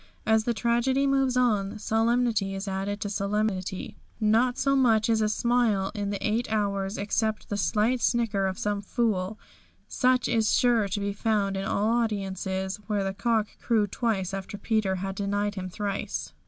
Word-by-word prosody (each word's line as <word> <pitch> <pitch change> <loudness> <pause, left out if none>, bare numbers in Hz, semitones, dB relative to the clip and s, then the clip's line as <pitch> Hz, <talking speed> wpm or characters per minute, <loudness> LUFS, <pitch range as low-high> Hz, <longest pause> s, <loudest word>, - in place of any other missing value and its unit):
As 220 0 +3
the 240 - +1
tragedy 240 +4 +1
moves 270 -2 +2
on, 215 -4 +1
solemnity 225 -2 +1
is 195 +1 -5
added 195 +1 -2
to - - -2
solemnity. 200 -2 -2 0.2
Not 230 +4 +2
so 275 0 +2
much 230 -4 +3
as 220 -1 +2
a 215 - +2
smile 220 -4 +1
in 205 -3 -3
the 200 +1 -2
eight 220 +2 -1
hours, 200 -2 -1
except 215 +1 -1
the 205 - -2
slight 210 +7 +1
snicker 220 -5 +1
of 190 -1 -3
some 205 -1 -1
fool, 210 -2 -1 0.5
such 255 0 +2
as 225 -2 +2
is - - +3
sure 235 -4 +3
to 200 +2 -2
be 200 0 -2
found 200 -2 0
in 195 0 -3
all 210 +3 +1
audiences, 195 -4 -1
when 205 -2 0
the 195 - -2
cock 225 +1 +1 0.2
crew 225 -3 +2
twice 200 -3 -2
after 195 +1 -5
Peter 210 -2 0
had 195 +1 -3
denied 205 +1 -1
him 185 -2 -5
thrice. 180 - -4
210 Hz, 175 wpm, -27 LUFS, 195-230 Hz, 0.5 s, As